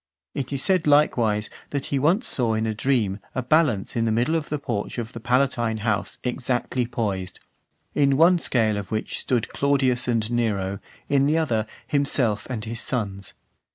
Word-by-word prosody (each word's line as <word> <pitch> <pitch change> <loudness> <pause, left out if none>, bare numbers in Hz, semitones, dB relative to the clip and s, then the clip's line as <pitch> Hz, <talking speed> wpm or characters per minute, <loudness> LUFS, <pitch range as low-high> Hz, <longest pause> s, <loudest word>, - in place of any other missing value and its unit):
It 140 -2 -4
is 140 -1 +3
said 185 -5 +2
likewise, 115 -8 +3 0.2
that 140 -2 -3
he 140 - +2
once 175 - +2
saw 115 -4 +2
in 110 +1 0
a 110 - -1
dream 110 -4 0 0.2
a 130 - -1
balance 135 -7 +2
in 115 -1 +1
the 110 - +1
middle 120 +8 +1
of 160 -2 -1
the 150 - -1
porch 120 -7 -4
of 120 -1 -5
the 115 - -6
Palatine 120 -2 +1
house 110 -2 -1
exactly 125 -1 -1
poised; 95 -6 -3 0.5
in 140 -2 +3
one 170 +3 +5
(462) - - -6
scale 110 -4 +2
of 100 -2 -7
which 110 0 -3
stood 120 -4 -1
Claudius 135 -3 +1
and 115 -2 0
Nero, 100 -5 -1 0.3
in 140 0 +3
the 155 +2 +2
other, 115 -9 0 0.2
himself 135 -7 0
and 115 -4 -4
his 115 +1 -2
sons. 100 -6 -2
120 Hz, 185 wpm, -24 LUFS, 110-140 Hz, 0.5 s, one